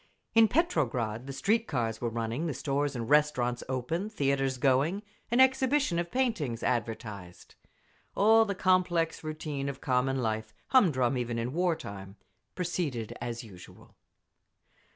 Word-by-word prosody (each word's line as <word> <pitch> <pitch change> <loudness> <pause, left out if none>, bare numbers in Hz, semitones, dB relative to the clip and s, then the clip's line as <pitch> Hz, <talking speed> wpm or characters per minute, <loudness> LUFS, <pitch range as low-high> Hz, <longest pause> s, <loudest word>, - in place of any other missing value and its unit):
In 225 -1 +7
Petrograd 130 - 0
the - - -4
street 215 - +1
cars 115 -5 -2
were 120 - 0
running, 115 +7 -2
the 150 - -3
stores 140 +1 -1
and 115 -2 -3
restaurants 140 -5 +2
open, 145 - -2
theatres 135 -7 0
going, 140 +10 +2 0.3
an 240 +2 +2
exhibition 265 -6 +3
of 170 0 -2
paintings 200 - -1
advertised…. 105 -6 -4 0.6
All 225 +2 +6
the 200 -3 -3
complex 180 -4 +1
routine 150 -3 -4
of 140 - -6
common 130 0 +1
life—humdrum 125 - +1
even 120 -1 -2
in 120 +3 -2
war 175 0 +1
time—proceeded 120 - -6
as 120 0 -4
usual. 95 -6 -14
140 Hz, 130 wpm, -29 LUFS, 120-180 Hz, 0.6 s, In